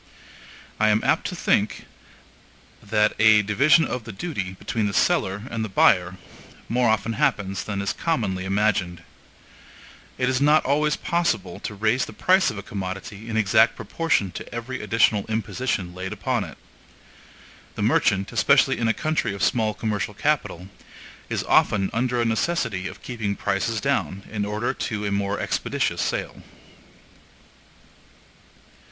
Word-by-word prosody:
I 110 0 +4
am 105 0 +2
apt - - +1
to - - -5
think - - 0 1.0
that 105 +1 +1
a 110 -1 +6
division 140 +11 +4
of 125 - -4
the 110 - -8
duty, 95 - -4
between 110 +1 -2
the 100 - -3
seller 95 +2 +1
and 115 -1 -2
the 110 - -4
buyer, 90 -1 +3 0.5
more 120 0 +2
often 110 +1 0
happens 105 -9 0
than 100 -2 -3
is 100 - -1
commonly 105 - -1
imagined. 95 -3 0 1.1
It 130 - 0
is 130 0 +1
not 150 +2 +4
always 150 +2 +2
possible 170 - -1
to 105 - -6
raise 110 +5 +1
the - - -10
price 190 -2 +4
of 110 - -6
a 100 - -6
commodity 100 +3 -6
in 110 - -2
exact 110 +2 +4
proportion 160 - -1
to - - -8
every 120 +3 -5
additional 115 -3 +2
imposition 110 -4 -2
laid 95 +2 -5
upon 105 +1 -1
it. 80 - -11 1.2
The - - -3
merchant, 95 0 +2
especially - - +3
in 115 - +1
a 115 - +2
country 155 -10 -1
of 100 - -4
small 110 -4 +1
commercial 105 0 -3
capital, 105 - -1 0.6
is - - -1
often 95 -2 +2
under 125 +1 0
a 120 - +1
necessity 115 - -1
of - - -10
keeping 110 -5 -3
prices 105 +4 -1
down 100 - -1
in 105 -2 -2
order 105 +3 -2
to 105 -3 -4
a 100 - -1
more 100 0 -1
expeditious - - -1
sale. - - -3
110 Hz, 150 wpm, -24 LUFS, 100-125 Hz, 1.2 s, a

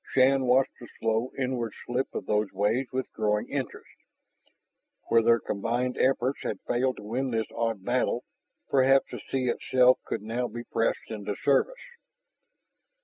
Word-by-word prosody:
Shann 135 0 +4
watched 130 +2 +4
the 120 - -10
slow 115 +3 0
inward 125 -4 -2
slip 125 +2 -1
of - - -3
those 105 -1 0
waves 110 +7 0
with 130 0 -3
growing 105 0 0
interest. - - -5 1.2
Where 115 - +5
their 115 +1 +4
combined 120 +5 -1
efforts 130 0 +2
had 100 - -3
failed 130 +2 +1
to - - -9
win 125 +5 -2
this 115 -2 0
odd 115 -4 -2
battle, 125 0 0 0.4
perhaps 135 0 +4
the - - -5
sea 130 -1 0
itself 125 +1 +4
could - - -3
now 120 +3 -2
be 120 0 -7
pressed 115 -1 -1
into 105 -2 -4
service. 145 - +3
120 Hz, 150 wpm, -28 LUFS, 110-130 Hz, 1.2 s, Where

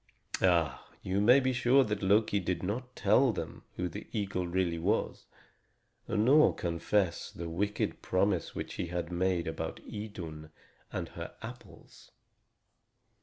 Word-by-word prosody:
Ah, 85 -4 +2 0.2
you 95 +2 0
may 125 +6 +7
be 130 -1 +1
sure 125 +2 +4
that 105 -3 -2
Loki 100 +1 +3
did 90 0 -2
not 125 +7 -3
tell 130 -2 +4
them 100 - -6
who 90 - -1
the 85 - -7
eagle 100 -4 -2
really 85 -1 0
was, 100 +7 -1 0.8
nor 125 +8 +5
confess 85 +2 0
the 85 - -7
wicked 100 +5 -1
promise 95 -1 0
which - - -5
he 90 - -3
had 85 0 -3
made 90 -1 +1
about 80 - -4
Idun 85 -8 -7 0.4
and - - -4
her - - -8
apples. - - -11
95 Hz, 135 wpm, -31 LUFS, 85-110 Hz, 0.8 s, may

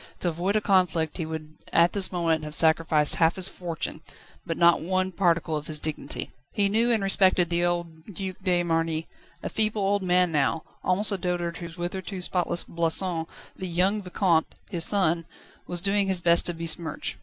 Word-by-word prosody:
To 175 - +1
avoid 175 +5 -2
a 215 - +2
conflict 180 -6 +1
he 165 - -3
would 155 -1 -7
at 170 +1 +4
this 200 -2 +2
moment 165 -3 0
have 150 0 -4
sacrificed 160 -2 +3
half 165 0 +3
his 185 -2 +3
fortune, 170 -3 -5 0.5
but 165 - -2
not 170 0 +4
one 185 +2 -1
particle 170 -3 +1
of 150 0 -5
his 155 - 0
dignity. 155 0 -4 0.2
He 200 -1 +1
knew 225 +4 +2
and 225 -4 +2
respected 185 -3 +3
the 170 0 +1
old 170 -2 -2
Duc 190 -1 -6
de 180 -2 +1
Marny, 165 -1 -1 0.4
a - - -2
feeble 215 -1 0
old 200 +1 +1
man 180 -1 +2
now, 155 +1 0 0.2
almost 200 +4 +3
a 200 - -1
dotard 175 -1 -2
whose 170 -1 -8
hitherto 185 +2 -5
spotless 180 -1 0
blason, 170 0 -1 0.3
the 190 - -6
young 185 +5 +1
Vicomte, 180 -3 +1 0.2
his 170 -3 +2
son, 170 -5 +1 0.4
was 175 -1 -1
doing 200 +1 +1
his 190 -2 +2
best 170 0 +4
to 175 - -1
besmirch. 165 0 -2
175 Hz, 185 wpm, -26 LUFS, 165-190 Hz, 0.5 s, at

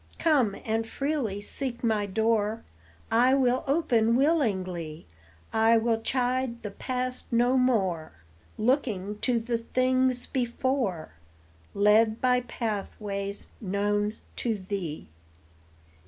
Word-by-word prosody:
Come 270 - +2
and 225 0 -1
freely 270 -7 -2
seek 250 +3 -5
my 215 -3 +1
door, 220 +1 0 0.5
I 250 +3 +5
will 255 -1 +2
open 245 -7 +2
willingly; 190 - 0 0.5
I 225 +1 +5
will 225 0 +1
chide 250 0 -1
the 210 - -4
past 255 +3 -4
no 240 +2 +3
more, 195 -11 +1 0.5
Looking 215 -5 0
to 245 0 +1
the 230 0 -2
things 255 +1 +1
before, 245 - -1 0.6
Led 215 +2 +4
by 250 -1 +3
pathways 205 -3 -4 0.2
known 205 +1 0 0.2
to 230 -3 0
thee. 185 - -5
230 Hz, 105 wpm, -27 LUFS, 205-255 Hz, 0.6 s, I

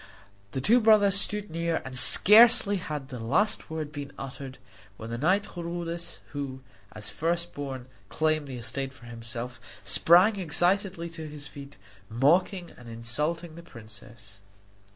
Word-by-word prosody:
The 130 - -3
two 230 - +4
brothers 215 -3 +4
stood 205 0 0
near, 165 0 -2
and 130 -1 -7
scarcely 210 - +7
had 150 -6 -7
the 125 -4 -8
last 150 - -1
word 155 -2 -6
been 145 -2 -8
uttered 135 0 -9 0.4
when 110 +1 -9
the 115 - -4
knight 185 +8 +1
Chrudis, 170 -1 -6
who, 140 -2 -6 0.3
as 105 -1 -5
first 170 +2 -3
born, 135 -3 -7 0.2
claimed 155 -2 -1
the 130 -2 -7
estate 130 +3 -4
for 120 - -17
himself, 115 +1 -7 0.3
sprang 175 - +4
excitedly 180 +1 -1
to 160 -2 -8
his 150 0 -10
feet, 140 -3 -12 0.3
mocking 170 - 0
and 120 -1 -13
insulting 150 +9 -3
the 170 - -11
princess. 110 - -15
150 Hz, 145 wpm, -26 LUFS, 125-175 Hz, 0.4 s, scarcely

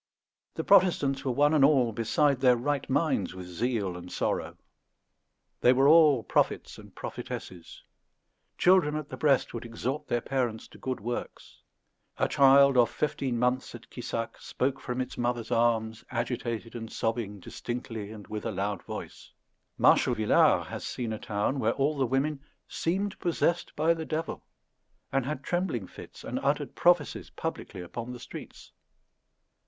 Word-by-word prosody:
The - - -2
Protestants 165 -9 +4
were 130 - 0
one 145 +4 +3
and 150 -3 +4
all 135 -5 +4
beside 135 +5 +2
their 125 -2 +5
right 140 +3 -2
minds 130 - 0
with 90 -1 -7
zeal 100 +1 -2
and 90 0 -9
sorrow. - - -2 1.0
They 125 - +5
were 135 +2 +4
all 150 -6 +6
prophets - - 0
and - - -15
prophetesses. 90 -3 -7 0.7
Children 180 -5 +4
at 155 -2 -4
the - - -6
breast 140 -4 +2
would 115 - -5
exhort 130 +6 -4
their 120 - +1
parents 120 -3 -2
to - - -15
good 130 -1 -3
works. 120 +3 -6 0.6
"A - - +2
child 140 -1 +6
of 120 -2 +5
fifteen 135 -4 -2
months 125 +1 0
at 115 - -13
Quissac 115 -2 -4
spoke 135 +1 -2
from 125 0 -3
its 130 -1 -6
mother's 120 -1 -1
arms, 115 -2 +1
agitated 120 -1 -3
and 115 -1 -7
sobbing, 115 -3 -2
distinctly 115 +1 -6
and 105 -2 -10
with 105 0 -5
a 115 - -2
loud 100 0 -2
voice." - - -8 0.5
Marshal - - +4
Villars 110 -1 +4
has - - -7
seen 115 -3 -3
a 110 - -5
town 105 +6 -1
where 115 -1 +2
all 145 +2 +1
the 135 -3 +1
women 135 +3 0 0.3
"seemed 195 +4 -2
possessed 175 0 0
by 160 +2 +3
the 165 -1 -5
devil," 160 +1 -3 0.7
and 135 -1 0
had 145 -2 -4
trembling 175 - -1
fits, - - -12
and - - -3
uttered - - -1
prophecies - - +2
publicly 90 - -5
upon 115 +7 -6
the 125 - -8
streets. 115 - -10
125 Hz, 160 wpm, -28 LUFS, 115-145 Hz, 1.0 s, all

